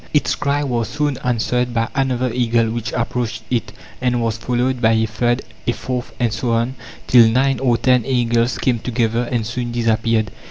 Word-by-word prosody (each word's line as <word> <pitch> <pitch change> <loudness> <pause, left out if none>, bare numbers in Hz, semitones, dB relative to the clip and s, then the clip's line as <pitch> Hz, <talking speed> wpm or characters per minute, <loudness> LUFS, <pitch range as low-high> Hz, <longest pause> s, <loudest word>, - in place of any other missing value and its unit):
Its 150 - +2
cry 145 +1 0
was 120 -5 -1
soon 145 +1 -1
answered 125 0 0
by 115 0 +1
another 130 -2 0
eagle 115 -2 +1
which 115 -1 -3
approached 120 -1 -2
it, 115 -4 -1 0.3
and 125 -1 +1
was 115 -2 0
followed 125 +2 -1
by 110 -1 +4
a 110 0 +2
third, 120 +3 0 0.2
a 120 - +2
fourth, 125 0 -4
and 120 -3 +1
so 115 +1 -1
on, 115 +3 0 0.3
till 120 -2 +7
nine 135 +3 +2
or 125 -3 +2
ten 125 +1 +3
eagles 120 -1 +1
came 125 -3 +1
together 120 0 -1
and 120 -3 0
soon 120 +1 -3
disappeared. 115 -2 +1
120 Hz, 185 wpm, -19 LUFS, 115-125 Hz, 0.3 s, till